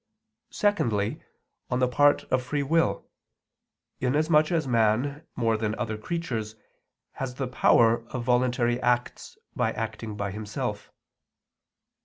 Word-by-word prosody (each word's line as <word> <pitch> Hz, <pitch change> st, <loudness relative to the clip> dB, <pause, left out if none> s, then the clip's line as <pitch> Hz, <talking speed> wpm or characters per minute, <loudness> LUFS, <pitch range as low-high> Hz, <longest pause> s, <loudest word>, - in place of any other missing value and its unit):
Secondly, 115 Hz, -, 0 dB, 0.5 s
on 125 Hz, -, 0 dB
the 125 Hz, 0 st, +2 dB
part 145 Hz, +3 st, +3 dB
of 130 Hz, -, +3 dB
free 140 Hz, +3 st, -2 dB
will, 140 Hz, -9 st, +1 dB, 0.9 s
inasmuch 150 Hz, +5 st, +2 dB
as 160 Hz, -4 st, 0 dB
man, 120 Hz, +6 st, +1 dB
more 115 Hz, -2 st, +1 dB
than 110 Hz, -1 st, -2 dB
other 110 Hz, -2 st, -3 dB
creatures, 110 Hz, -4 st, -4 dB, 0.6 s
has 130 Hz, -2 st, -5 dB
the 135 Hz, 0 st, -3 dB
power 115 Hz, -2 st, +4 dB
of 125 Hz, 0 st, -5 dB
voluntary 125 Hz, 0 st, +1 dB
acts 125 Hz, 0 st, -1 dB, 0.2 s
by -, -, +1 dB
acting 110 Hz, -2 st, -5 dB
by 100 Hz, -1 st, -2 dB
himself. 105 Hz, +1 st, -5 dB
125 Hz, 120 wpm, -26 LUFS, 110-140 Hz, 0.9 s, power